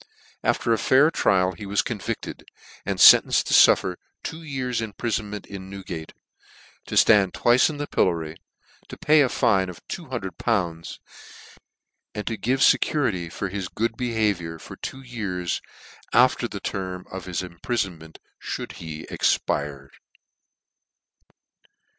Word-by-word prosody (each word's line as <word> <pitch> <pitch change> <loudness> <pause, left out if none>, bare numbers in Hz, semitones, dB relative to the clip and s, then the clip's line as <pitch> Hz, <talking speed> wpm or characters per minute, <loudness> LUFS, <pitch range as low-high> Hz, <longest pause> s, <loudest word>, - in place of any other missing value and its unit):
After 115 - +1
a 110 - 0
fair 145 +5 +4
trial 95 - +2
he 95 +3 -9
was 100 +1 +1
convicted, - - -5 0.4
and - - -2
fen - - +10
tenced - - 0
to - - -2
fuffer - - +5 0.3
two 160 +1 -6
years 130 -6 -3
imprifonment 105 -2 -4
in 95 -1 -9
New 100 0 -8
gate, 80 -5 -7 0.8
to - - -5
ftand 100 -4 +5
twice 120 +5 +4
in 150 - -6
the 145 - -3
pillory, 80 - 0 0.5
to - - -10
pay 155 0 +4
a 135 - +3
fine 100 -8 +2
of 90 - -9
two 175 - -6
hundred 95 -9 -5
pounds, 85 -8 -2 1.2
and 105 - -4
to 115 - -2
give 130 +5 -1
fecurity 100 - +2
for 95 +2 -4
his 95 -1 -4
good 115 +4 -2
behaviour 105 -9 -1
for - - -11
two 135 +1 -7
years 100 -8 -3 0.5
after - - +4
the - - -7
term 95 -2 -5
of 95 -1 -7
his 90 0 -3
imprifonment 90 -3 -4 0.3
fliould - - -5
he 80 -1 -8
expired. 70 -2 -1
100 Hz, 140 wpm, -24 LUFS, 90-120 Hz, 1.2 s, fen